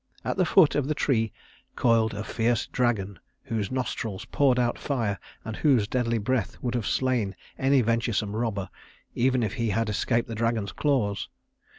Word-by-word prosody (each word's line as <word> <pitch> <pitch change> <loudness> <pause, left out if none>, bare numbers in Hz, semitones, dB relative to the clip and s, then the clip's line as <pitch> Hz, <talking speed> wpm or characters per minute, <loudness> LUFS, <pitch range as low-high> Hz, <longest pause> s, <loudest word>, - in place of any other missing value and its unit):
At - - -1
the 185 - +2
foot 165 -2 +5
of 140 -2 0
the 155 - 0
tree 115 -8 +1 0.4
coiled 115 -2 +2
a 105 - -3
fierce 115 +1 0
dragon 100 -7 -1 0.2
whose 110 -3 -2
nostrils 115 -6 -3
poured 135 -3 +2
out 120 -1 +1
fire, 115 -8 -1 0.3
and 110 -1 -4
whose 130 -9 +3
deadly 115 -1 0
breath 110 -2 -1
would 125 -1 -1
have 120 -4 -1
slain 120 -7 0 0.2
any 135 0 +4
venturesome 115 -2 0
robber, 110 -4 -2 0.4
even 130 0 +2
if 105 -1 -1
he 115 -3 -1
had 110 +2 0
escaped 115 +3 0
the 115 - -5
dragon's 110 -2 -1
claws. 100 - 0
115 Hz, 170 wpm, -26 LUFS, 105-130 Hz, 0.4 s, foot